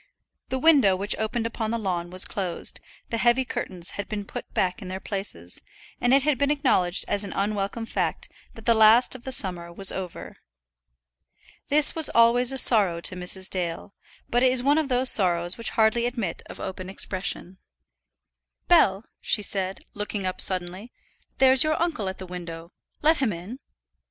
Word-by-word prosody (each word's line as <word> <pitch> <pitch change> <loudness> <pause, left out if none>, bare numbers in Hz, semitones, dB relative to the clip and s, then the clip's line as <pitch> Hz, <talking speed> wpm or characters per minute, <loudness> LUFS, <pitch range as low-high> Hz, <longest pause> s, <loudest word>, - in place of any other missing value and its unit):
The 260 - -2
window 265 -9 +4
which 200 +3 -1
opened 225 +1 -2
upon 230 -1 -3
the 230 - -1
lawn 180 -5 -3
was 185 +1 +1
closed, 185 -4 -2 0.3
the 230 - -1
heavy 245 +3 +2
curtains 180 -7 -4
had 200 - -6
been 205 -2 -5
put - - -8
back 180 +2 -1
in 190 - -8
their 185 +1 -5
places, 190 - -6 0.4
and 245 - +1
it 270 0 +4
had 290 -3 0
been 280 - +1
acknowledged 250 - +2
as 205 - -1
an 200 - -6
unwelcome 205 +2 -2
fact - - -3 0.3
that 225 - -13
the 235 - +4
last 220 +2 +5
of 255 -2 -11
the 265 - -4
summer 180 -7 +2
was 195 +2 0
over. 185 -3 -7 1.3
This 295 +1 +4
was 320 -3 +4
always 235 +2 +4
a 270 - -4
sorrow 205 -9 +5
to 185 - -1
Mrs. 185 +1 -1
Dale; 180 +1 -4 0.3
but 245 - 0
it 255 0 +4
is 255 -1 +2
one 290 +3 +3
of 310 - -2
those 255 0 +4
sorrows 175 -2 +3
which 230 - 0
hardly 225 +2 +1
admit 230 -9 -4
of - - -10
open 185 -1 -6
expression. 185 -1 -3 1.1
"Bell," 215 - +3
she 210 - 0
said, 190 -1 -2
looking 205 -1 -4
up 185 - -3
suddenly; 185 +5 -2 0.5
"there's 265 -1 +5
your 310 0 0
uncle 310 - -2
at 190 - -7
the 190 - -8
window. 170 -2 -9 0.3
Let 315 +1 +4
him 265 -5 0
in." 185 +9 -8
205 Hz, 180 wpm, -24 LUFS, 185-245 Hz, 1.3 s, last